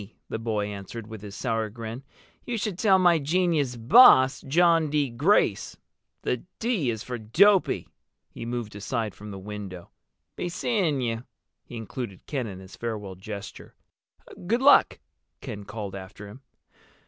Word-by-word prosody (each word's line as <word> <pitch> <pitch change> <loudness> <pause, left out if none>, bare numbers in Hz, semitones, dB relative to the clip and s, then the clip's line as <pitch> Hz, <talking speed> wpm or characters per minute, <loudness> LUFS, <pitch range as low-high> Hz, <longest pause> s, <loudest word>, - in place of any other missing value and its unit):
the 110 - -3
boy 110 -2 -1
answered, 105 +2 -7
with 110 -2 -9
his 105 -1 -9
sour 115 -3 -1
grin. 115 +3 -7 0.4
"You 240 -2 -3
should 205 -4 -3
tell 195 -4 +5
my 175 -3 +4
genius 155 -4 +1
boss—John 160 - +5
D. 145 -3 0
Grace. 125 - +1 0.5
The 125 - 0 0.2
D 220 - 0
is 110 -2 -3
for 125 -1 -5
dopey." 185 - +3 0.4
He - - -8
moved 120 -3 -4
aside 105 0 -3
from 105 +1 -11
the 100 - -7
window. 95 -3 -8 0.4
"Be 175 - -3
seeing 175 - 0
you!" 115 -1 -2 0.4
He - - -11
included 115 -3 -7
Ken 130 -5 -3
in 95 -3 -8
his 95 0 -12
farewell 105 -4 -5
gesture. 100 +2 -9 0.7
"Good 235 +6 +1
luck!" 285 - +6 0.4
Ken 105 -6 -7
called 105 -2 -6
after 100 +1 -9
him. 120 +7 -12
115 Hz, 150 wpm, -26 LUFS, 105-160 Hz, 0.7 s, luck